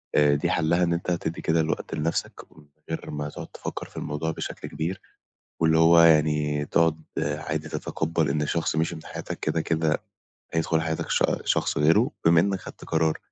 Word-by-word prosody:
آآ، 75 -1 +5
دي 70 - 0
حَلّها 85 +3 +2
إن 85 - +2
أنت 85 +1 -2
تدّي 85 -1 -2
كده 80 0 +1
الوقت 80 - -2
لنَفْسك 80 +2 -2
من 75 - -16 0.2
غير 80 - -4
ما 75 0 -4
تقعد - - -8
تفكّر - - -6
في - - -15
الموضوع 75 +2 -2
بشكل - - -6
كبير 90 +5 -3 0.6
واللي 80 0 +4
هو 85 +1 +7
يعني 75 -2 +3
تقعد 80 0 +2 0.2
عادي 75 +1 -2
تتقبّل 80 -1 -1
إن 75 +2 0
شخص 85 -2 0
مِشِي 80 +2 0
من 80 - -10
حياتك - - -6
كده، 80 +1 0
كده 80 -1 0 0.5
هيدخُل 80 0 +1
حياتك 80 -1 -3
ش - - +2 0.2
شخص - - +1
غيرُه، 75 +3 +4
بما 85 0 +6
إنّك 95 +2 +1
خدت - - -11
قرار 80 -1 +1
80 Hz, 180 wpm, -25 LUFS, 75-85 Hz, 0.6 s, هو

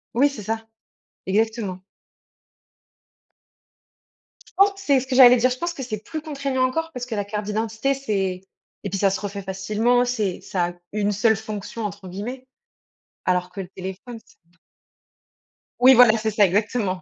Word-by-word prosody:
Oui, 280 +4 +4
c'est 275 -6 -8
ça. 225 +2 -3 0.6
Exactement. 210 -1 -1 2.7
Je - - -28
pense 395 +1 +6
que 390 - -15
c'est 285 -8 +3
ce 260 - -7
que 255 - -2
j'allais 250 -1 +9
dire, 250 +2 +3
je 250 - -3
pense 345 +4 -3
que 280 - -8
c'est 215 -4 -5
plus 315 -1 -6
contraignant 280 -4 -2
encore, 325 +5 -3
parce 250 -2 -5
que 235 -3 -5
la 205 - -1
carte 210 0 -4
d'identité 220 +5 -1
c'est 195 -9 -2 0.4
et 200 - -3
puis 195 +1 -3
ça 195 0 +4
se 195 - -2
refait 200 -1 -5
facilement 210 +6 +1
c'est 215 -7 -2
ça 180 -2 -1
a 175 - -7 0.2
«une 205 -1 0
seule 220 +1 +3
fonction» 215 +1 -6
entre 200 -1 -6
guillemets, 245 +8 -6 0.8
alors 180 0 0
que 195 - -7
le 185 - -6
téléphone 190 +6 -8
c'est - - -23 0.2
t 180 - -32 1.2
Oui 255 +2 +8
voilà 240 -3 +7
c'est 220 0 -1
ça, 205 0 +4
exactement. 200 0 0
220 Hz, 175 wpm, -23 LUFS, 195-250 Hz, 2.7 s, j'allais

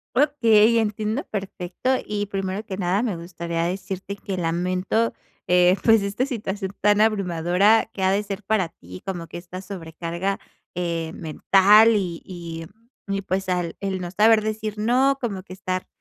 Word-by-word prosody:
Okey, 230 -6 +4
entiendo, 215 +3 -1
perfecto. 195 +3 -4 0.2
Y 205 -1 -2
primero 195 +1 -3
que 195 -4 -6
nada, 185 +2 +1
me 215 -8 -1
gustaría 170 -1 -4
decirte 190 +2 -4
que 195 -1 -5
lamento, 180 +6 0 0.4
eh, 180 0 +5
pues 225 -3 +5
esta 210 +7 -1
situación 205 -6 -4
tan 205 +1 +4
abrumadora 200 +1 +3
que 195 -3 -4
ha 190 - +4
de 200 +1 +2
ser 200 0 -6
para 195 -4 +1
ti, 90 - -12
como 175 -3 -3
que 170 - -9
esta 180 +1 -9
sobrecarga, 175 0 -4 0.4
eh, 170 -2 -2
mental, 200 +7 +5
y 180 -4 -2
y 170 -3 -7 0.4
y 195 0 -1
pues, 190 0 -2
al 175 -2 -1
el 190 -2 -3
no 175 -1 -5
saber 215 +2 +5
decir 215 -1 -3
no, 255 +5 +3
como 210 -7 -3
que 185 - -11
estar 185 -1 -3
195 Hz, 160 wpm, -23 LUFS, 180-215 Hz, 0.4 s, eh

